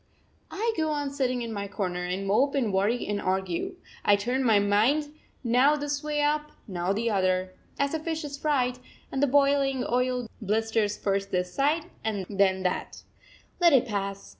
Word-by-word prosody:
I 450 +3 -1
go 315 -1 0
on 290 -2 -2
sitting 255 -3 -1
in 230 -1 -5
my 200 -1 -4
corner, 180 -3 -3
and 185 +2 -3
mope 260 +9 +2
and 235 -7 0
worry 205 +6 +1
and 205 -1 -2
argue. 190 - -1 0.3
I 205 - +5
turn 245 +6 -1
my 225 -4 +5
mind 225 +10 +2 0.3
now 255 +5 +4
this 290 0 -3
way 300 -1 0
up, 300 +1 0 0.2
now 180 -2 -1
the 225 +3 0
other 185 -1 +1 0.2
as 280 +1 0
a 320 - 0
fish 320 0 -3
is 290 -1 -5
fried 260 -4 0 0.3
and 270 - -1
the 285 - +4
boiling 275 -1 +3
oil 250 0 0
blisters 215 0 0
first 195 0 -1
this 180 -1 -1
side, 300 +4 +1 0.2
then 195 -2 0
that. 180 - -3 0.6
Let 340 -3 +6
it 265 - +5
pass. 200 -2 -3
235 Hz, 175 wpm, -27 LUFS, 200-285 Hz, 0.6 s, Let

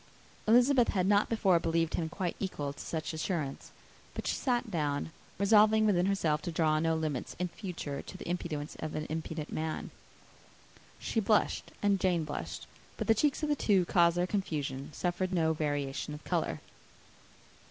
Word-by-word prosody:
Elizabeth 245 +2 +5
had 185 -3 +1
not 205 +1 +3
before 195 -6 +3
believed 165 0 0
him 160 -2 -1
quite 180 0 -3
equal 145 -8 -3
to 145 - -15
such 160 0 -4
assurance; 155 -3 -3 0.5
but - - -4
she - - +1
sat 245 -3 0
down, 150 -2 -1 0.3
resolving 215 +2 +5
within 185 -3 +3
herself 165 -6 +1
to 175 - -4
draw 155 -2 +2
no 165 0 +2
limits 155 -5 -3
in 180 0 -1
future 165 -7 -5
to 185 - -10
the - - -8
impudence 165 -4 -3
of 155 -1 -4
an 155 - -2
impudent 160 -1 -4
man. 155 0 -3 1.1
She 225 - -1
blushed, 215 0 +2
and 200 -1 +3
Jane 175 -3 +2
blushed; 150 -1 -5 0.3
but - - -2
the 225 - +5
cheeks 285 +7 +1
of 305 - +1
the 295 - +3
two 210 -7 +3
who - - -1
caused 170 -1 +4
their 175 - +2
confusion 145 -9 -2
suffered 180 +3 -1
no 160 -3 +2
variation 145 -1 -2
of 150 - -12
colour. - - -1
170 Hz, 175 wpm, -31 LUFS, 155-200 Hz, 1.1 s, Elizabeth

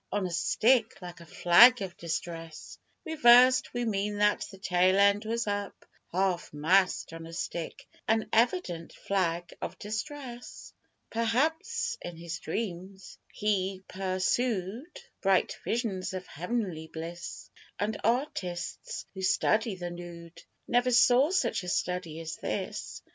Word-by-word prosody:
(On 205 -2 0
a 180 - -3
stick, 225 +5 +2
like 175 -2 -9
a 170 - -13
flag 230 +9 +7
of 185 -3 -6
distress 165 -1 -6 0.3
Reversed 255 -5 +6
we 245 -1 -2
mean 205 -1 -1
that 210 0 +2
the 195 - -12
tail 185 0 +2
end 200 +2 +4
was 230 +2 -1
up 205 -1 -4 0.3
Half 185 -1 0
mast 180 +3 +2
on 165 0 -8
a 165 - -10
stick 165 0 -5 0.2
an 220 0 +2
evident 225 - +1
flag 175 -3 -1
of - - -5
distress.) 240 +4 -7 0.4
Perhaps 320 - 0
in 175 - -7
his 170 0 -6
dreams 190 0 -5
he 195 -2 -1
persood 195 - -1 0.3
Bright 195 -1 +2
visions 205 -6 -2
of 185 -1 -5
heav'nly 180 -2 -3
bliss; 165 +2 -8 0.3
And 210 +1 -2
artists 205 - -2
who 190 - -7
study 200 +3 +2
the 175 -1 -5
nood 175 -1 -10 0.3
Never 245 +1 +2
saw 250 +3 +5
such 370 - +1
a 180 - -5
study 180 -3 -2
as 165 0 -6
this. - - -4
195 Hz, 130 wpm, -29 LUFS, 175-230 Hz, 0.4 s, flag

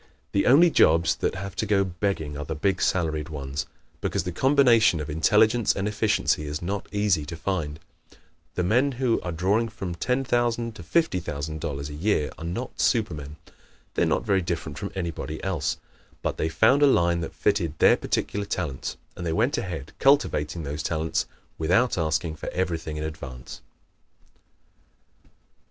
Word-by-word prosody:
The 100 - +1
only 165 +7 +7
jobs 85 - +4
that - - -1
have 95 +1 -6
to 110 - -1
go 100 -1 +3
begging 90 -5 -2
are 75 - -4
the 80 +2 -4
big 95 +4 0
salaried 80 -3 0
ones, 70 -2 -4 0.3
because - - -1
the 90 - -3
combination 120 - +4
of 75 0 -4
intelligence 110 +8 +3
and 100 +1 -1
efficiency 105 -7 +1
is 75 +1 -3
not 95 +3 -3
easy 105 -6 +1
to 85 - -5
find. 80 -4 -3 0.8
The 90 - 0
men 125 +9 +2
who 125 -2 +1
are 90 - -4
drawing 100 +7 +1
from 95 -4 -5
$10,000 120 +2 0
to 110 - -10
$50,000 80 - -2
a - - -7
year 75 -1 0
are - - -7
not 90 +10 -5
supermen. 75 - 0 0.6
They - - -1
are - - +4
not - - 0
very 100 -3 +2
different 80 -4 -4
from 100 - -5
anybody 85 -4 -4
else. 85 -8 -1 0.5
But - - -1
they 80 - 0
found 120 - +4
a 145 - +7
line 85 -8 +3
that 80 - -6
fitted 90 -7 0
their - - +6
particular 100 0 -2
talents, 80 -10 -3 0.2
and 90 - -7
they 85 - -1
went 120 - +2
ahead 80 -6 -5
cultivating 90 - +2
those 75 +1 -4
talents 80 0 -1 0.3
without 95 +10 +2
asking 80 0 -1
for - - -5
everything 80 -4 -2
in 75 - -3
advance. 65 -6 -7
90 Hz, 165 wpm, -25 LUFS, 80-105 Hz, 0.8 s, only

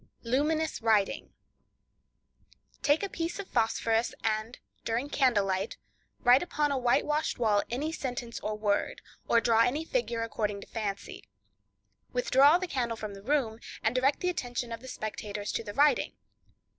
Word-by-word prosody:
Luminous 300 +6 0
Writing.—Take 230 - -3
a 400 - -1
piece 335 -1 -3
of 400 -2 -6
phosphorus, 225 0 +1
and, 220 +2 -1 0.3
during 235 +5 -1
candle 245 -8 +3
light, 190 +2 -2 0.4
write 245 +2 +6
upon 300 -4 0
a 275 - +1
whitewashed 295 +5 +1
wall 215 -4 +3
any 285 +7 -2
sentence 245 -6 -4
or 215 0 -3
word, 205 -1 -1 0.2
or 235 - +5
draw 230 -1 +3
any 285 +7 +1
figure 280 - -1
according 210 -2 -2
to - - -9
fancy. 205 -3 -5 0.9
Withdraw 270 +5 +5
the 370 - -3
candle 240 -8 -2
from 215 -2 -6
the 195 - -10
room, 235 -2 0 0.2
and 220 - +2
direct 260 +3 +2
the 360 - +1
attention 245 -7 -3
of 230 - -4
the 260 - -12
spectators 210 -3 -5
to - - -2
the 205 - -7
writing. 285 -2 +3
240 Hz, 150 wpm, -29 LUFS, 220-285 Hz, 0.9 s, write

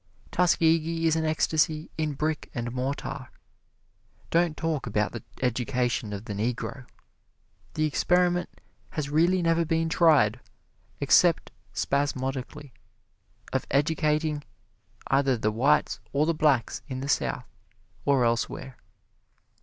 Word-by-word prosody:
Tuskegee 165 -1 +2
is 160 -1 +3
an 160 0 0
ecstasy 155 0 +1
in 155 -2 -1
brick 155 +2 -2
and 120 -1 -3
mortar. 130 +1 -4 1.0
Don't 170 -2 +2
talk 160 -5 -2
about 105 -1 0
the 120 - -6 0.2
education 125 -2 0
of 100 +1 -6
the 105 - -5
Negro! 125 +4 -3 0.9
The 155 - +1
experiment 175 +3 +2 0.4
has 145 -2 -3
really 175 +4 +3
never 165 0 +3
been 165 0 0
tried, 150 - +4 0.6
except - - +4 0.2
spasmodically, 140 0 -2 0.8
of - - -1
educating 150 +1 +1 0.6
either 135 -2 +2
the 110 -1 0
whites 135 +7 +2
or 145 +2 +3
the 165 - +1
blacks 145 -7 +1
in 130 -2 -5
the 140 - -4
South 145 - 0 0.6
or 135 -4 +3
elsewhere. 120 +2 -2
145 Hz, 115 wpm, -27 LUFS, 125-160 Hz, 1.0 s, tried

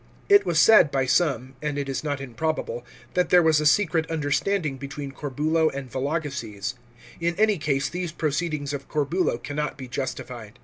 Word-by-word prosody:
It 405 0 +6
was 170 -2 +1
said, 215 -8 +7
by 135 -2 0
some, 130 -3 +1
and 150 -1 -2
it 140 -1 -2
is 135 +1 -3
not 145 -2 -2
improbable, 155 - -3 0.3
that 180 -1 +1
there 180 -1 +6
was 155 -2 +4
a 150 - +3
secret 160 -1 +2
understanding 150 +1 0
between 140 +1 -6
Corbulo 155 +4 0
and 135 -3 -7
Vologeses. 130 -7 -3 0.5
In 170 +1 0
any 210 -1 +3
case 140 -2 0
these 175 0 -4
proceedings 155 -2 -2
of 140 -1 -5
Corbulo 150 -1 0
cannot 150 +4 -4
be 130 -2 -7
justified. 125 -4 -5
150 Hz, 170 wpm, -25 LUFS, 135-165 Hz, 0.5 s, said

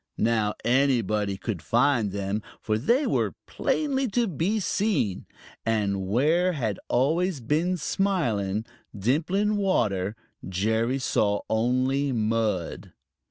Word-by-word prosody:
Now 110 -2 +1
anybody 115 -6 +2
could 100 -4 -4
find 120 -4 +2
them, 100 +2 -2 0.2
for 110 -1 -1
they 245 - +2
were - - 0
plainly 275 -3 0
to 235 +2 +1
be 190 +4 0
seen. 185 - 0 0.4
And 100 -4 0
where 160 - +2
had 110 - -2
always 160 +6 +1
been 155 +9 0
smiling, 115 - 0 0.3
dimpling 175 - +1
water, 105 - 0 0.3
Jerry 110 +7 0
saw 105 -5 +1
only 130 +5 +1
mud. 110 -6 -1
120 Hz, 110 wpm, -26 LUFS, 105-170 Hz, 0.4 s, anybody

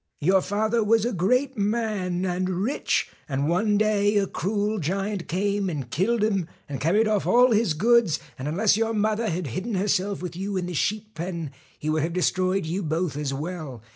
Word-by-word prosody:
Your 185 +5 +4
father 220 +4 0
was 225 +1 +3
a 245 - -1
great 250 +8 +1
man, 200 -4 -1
and 185 0 -1
rich, 195 +10 0 0.2
and 140 +1 0
one 205 +5 +2
day 210 -1 +2
a 200 - +3
cruel 205 +3 -1
giant 195 +3 -2
came 200 +2 0
and 140 -8 -5
killed 210 - +1
him 195 -6 +1 0.2
and 140 -3 -5
carried 205 +9 +3
off 210 -2 0
all 250 +1 +5
his 215 -7 +2
goods, 220 -3 +4 0.2
and 130 - -4
unless 195 +7 +3
your 225 +1 0
mother 215 +1 +1
had 175 +1 -2
hidden 190 - -3
herself 195 0 0
with 180 - -5
you 195 +2 -3
in 180 - -1
the 180 - -5
sheep 215 +6 -1
pen, 170 -3 -4 0.3
he 150 - -6
would 155 0 +1
have 165 +3 -2
destroyed 185 +1 +1
you 175 +5 -2
both 160 -1 -1
as 145 -2 -2
well. 145 -5 -5
195 Hz, 195 wpm, -25 LUFS, 170-215 Hz, 0.3 s, all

